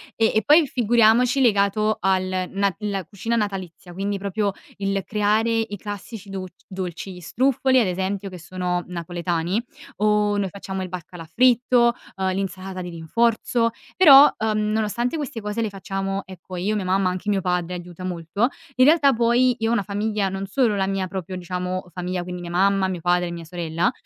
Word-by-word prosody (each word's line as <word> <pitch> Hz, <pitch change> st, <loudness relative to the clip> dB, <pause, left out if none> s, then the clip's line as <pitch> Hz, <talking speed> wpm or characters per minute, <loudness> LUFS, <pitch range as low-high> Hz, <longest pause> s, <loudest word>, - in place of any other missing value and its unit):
E 225 Hz, -1 st, +3 dB
e 220 Hz, -, +2 dB
poi 305 Hz, +1 st, +6 dB
figuriamoci 240 Hz, +1 st, +3 dB
legato 215 Hz, -1 st, +2 dB
al 185 Hz, -1 st, 0 dB
na 200 Hz, -1 st, +1 dB
la 200 Hz, -3 st, -2 dB
cucina 220 Hz, +6 st, -3 dB
natalizia, 190 Hz, -5 st, -4 dB
quindi 200 Hz, +2 st, -2 dB
proprio 200 Hz, +1 st, -1 dB, 0.2 s
il 195 Hz, -1 st, -1 dB
creare 215 Hz, +2 st, +1 dB
i 220 Hz, -2 st, -3 dB
classici 205 Hz, 0 st, -8 dB
doc 190 Hz, -1 st, -5 dB, 0.2 s
dolci: 185 Hz, 0 st, -6 dB
gli 180 Hz, -, -10 dB
struffoli, 260 Hz, -, +2 dB
ad 205 Hz, -, +1 dB
esempio, 190 Hz, +2 st, -2 dB
che 180 Hz, -1 st, -9 dB
sono 180 Hz, 0 st, -2 dB
napoletani, 175 Hz, +2 st, -2 dB, 0.4 s
o 210 Hz, 0 st, +2 dB
noi 195 Hz, -1 st, 0 dB
facciamo 190 Hz, 0 st, -6 dB
il -, -, -5 dB
baccalà 175 Hz, -1 st, -8 dB
fritto, 245 Hz, +4 st, +4 dB, 0.2 s
uhm, 190 Hz, -1 st, -1 dB
l'insalata 190 Hz, 0 st, -4 dB
di 175 Hz, -1 st, -6 dB
rinforzo. 230 Hz, +7 st, +1 dB, 0.3 s
Però, 290 Hz, -5 st, +9 dB
uhm, 220 Hz, -1 st, 0 dB
nonostante 235 Hz, +6 st, -1 dB
queste 280 Hz, -6 st, -5 dB
cose 210 Hz, +2 st, -3 dB
le 220 Hz, -, 0 dB
facciamo, 195 Hz, 0 st, -4 dB
ecco, 185 Hz, 0 st, -10 dB
io, 200 Hz, +5 st, -1 dB
mia 195 Hz, -, -3 dB
mamma, 185 Hz, 0 st, +2 dB
anche 185 Hz, +3 st, -5 dB
mio 200 Hz, -2 st, +1 dB
padre 180 Hz, -1 st, -1 dB
aiuta 175 Hz, +1 st, -8 dB
molto, 180 Hz, +5 st, -1 dB, 0.3 s
in 255 Hz, -, +5 dB
realtà 295 Hz, -2 st, +5 dB
poi 240 Hz, +1 st, +3 dB
io 225 Hz, 0 st, 0 dB
ho -, -, +2 dB
una 205 Hz, -, +1 dB
famiglia, 205 Hz, 0 st, -1 dB
non 195 Hz, +1 st, -4 dB
solo 215 Hz, 0 st, +1 dB
la 190 Hz, 0 st, +1 dB
mia 195 Hz, -1 st, -1 dB
proprio 190 Hz, -1 st, -5 dB
diciamo 180 Hz, 0 st, -4 dB
famiglia, 180 Hz, 0 st, -3 dB
quindi 180 Hz, 0 st, -6 dB
mia 175 Hz, 0 st, -7 dB
mamma, 195 Hz, +1 st, +2 dB
mio 180 Hz, -3 st, -4 dB
padre 175 Hz, 0 st, +2 dB
e -, -, -5 dB
mia 170 Hz, -1 st, -6 dB
sorella, 170 Hz, +4 st, -1 dB
195 Hz, 180 wpm, -23 LUFS, 180-220 Hz, 0.4 s, Però